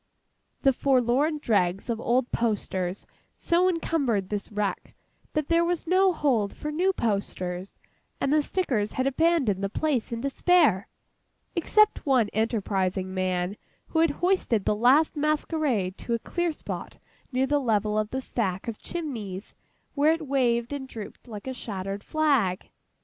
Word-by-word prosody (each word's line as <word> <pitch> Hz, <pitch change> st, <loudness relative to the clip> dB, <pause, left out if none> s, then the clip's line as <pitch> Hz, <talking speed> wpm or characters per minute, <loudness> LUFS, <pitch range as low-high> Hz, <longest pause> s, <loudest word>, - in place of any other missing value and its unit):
The 270 Hz, -1 st, +5 dB
forlorn 265 Hz, +4 st, +2 dB
dregs 195 Hz, -8 st, +1 dB
of 230 Hz, -1 st, -2 dB
old 245 Hz, +1 st, +1 dB
posters 195 Hz, -5 st, -1 dB, 0.3 s
so 355 Hz, +2 st, +2 dB
encumbered 280 Hz, -, 0 dB
this 205 Hz, 0 st, -4 dB
wreck, 210 Hz, -1 st, -3 dB, 0.4 s
that 305 Hz, -2 st, -1 dB
there 335 Hz, 0 st, +3 dB
was 345 Hz, 0 st, -1 dB
no 370 Hz, +2 st, +4 dB
hold 250 Hz, -, 0 dB
for 300 Hz, -, -4 dB
new 360 Hz, +5 st, +2 dB
posters, 195 Hz, -, -3 dB, 0.4 s
and 275 Hz, -, +1 dB
the 305 Hz, -, +4 dB
stickers 260 Hz, -, -1 dB
had 260 Hz, -, 0 dB
abandoned 275 Hz, -, +2 dB
the 195 Hz, -, 0 dB
place 275 Hz, 0 st, -1 dB
in 230 Hz, -, -3 dB
despair, 275 Hz, -, +3 dB, 0.7 s
except 425 Hz, +5 st, +3 dB
one 255 Hz, -7 st, +3 dB
enterprising 195 Hz, -4 st, -1 dB
man 185 Hz, +1 st, -1 dB, 0.3 s
who 320 Hz, -, 0 dB
had 330 Hz, 0 st, +5 dB, 0.2 s
hoisted 305 Hz, -, +1 dB
the -, -, +3 dB
last 260 Hz, +10 st, +4 dB
masquerade 295 Hz, -, 0 dB
to 235 Hz, -, -1 dB
a 230 Hz, -, -6 dB
clear 345 Hz, -1 st, 0 dB
spot 305 Hz, -, -7 dB, 0.3 s
near 260 Hz, +1 st, +2 dB
the 290 Hz, +2 st, +2 dB
level 215 Hz, -5 st, +1 dB
of 215 Hz, 0 st, 0 dB
the 260 Hz, +2 st, -3 dB
stack 195 Hz, -7 st, -2 dB
of 230 Hz, -2 st, -4 dB
chimneys 225 Hz, -, -6 dB, 0.4 s
where 295 Hz, +2 st, +4 dB
it 325 Hz, -1 st, -4 dB
waved 240 Hz, -2 st, +1 dB
and 275 Hz, -2 st, -5 dB
drooped 225 Hz, 0 st, -9 dB
like 210 Hz, -3 st, -8 dB
a 260 Hz, -, -3 dB
shattered 200 Hz, -4 st, -5 dB
flag. 275 Hz, -13 st, +1 dB
245 Hz, 150 wpm, -26 LUFS, 205-305 Hz, 0.7 s, The